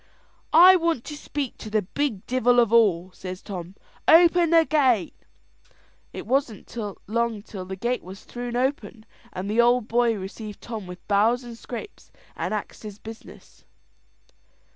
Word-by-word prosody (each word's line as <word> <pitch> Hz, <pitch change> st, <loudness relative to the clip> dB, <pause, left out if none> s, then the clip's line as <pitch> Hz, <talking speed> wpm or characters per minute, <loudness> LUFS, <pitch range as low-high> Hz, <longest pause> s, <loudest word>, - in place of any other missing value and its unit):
"I 365 Hz, +3 st, +9 dB
want 335 Hz, -7 st, 0 dB
to 300 Hz, -, -7 dB
speak 290 Hz, -3 st, -5 dB
to 215 Hz, -, -8 dB
the 215 Hz, -1 st, +1 dB
big 225 Hz, 0 st, -3 dB
divel 245 Hz, -1 st, +3 dB
of 230 Hz, -2 st, +3 dB
all," 190 Hz, -6 st, +3 dB
says 185 Hz, 0 st, -8 dB
Tom: 185 Hz, -1 st, -7 dB, 0.3 s
"open 340 Hz, +1 st, +6 dB
the 330 Hz, -1 st, +5 dB
gate." 260 Hz, -, +2 dB, 1.0 s
It -, -, -7 dB
wasn't 245 Hz, -3 st, -2 dB, 0.3 s
long 230 Hz, -1 st, -1 dB
till 195 Hz, -4 st, -8 dB
the 190 Hz, +1 st, -6 dB
gate 240 Hz, +6 st, -2 dB
was 190 Hz, +2 st, -11 dB
thrune 245 Hz, 0 st, -6 dB
open, 250 Hz, -3 st, -2 dB, 0.3 s
and 185 Hz, +1 st, -5 dB
the 220 Hz, +3 st, +3 dB
Ould 240 Hz, -1 st, +3 dB
Boy 235 Hz, 0 st, +2 dB
received 205 Hz, +2 st, -8 dB
Tom 220 Hz, -5 st, -7 dB
with 180 Hz, 0 st, -11 dB
bows 220 Hz, +5 st, +2 dB
and 240 Hz, -1 st, -9 dB
scrapes, 240 Hz, -, -9 dB, 0.2 s
and -, -, -3 dB
axed 215 Hz, -1 st, -5 dB
his 210 Hz, -2 st, -9 dB
business. 225 Hz, +1 st, -13 dB
230 Hz, 155 wpm, -24 LUFS, 205-255 Hz, 1.0 s, I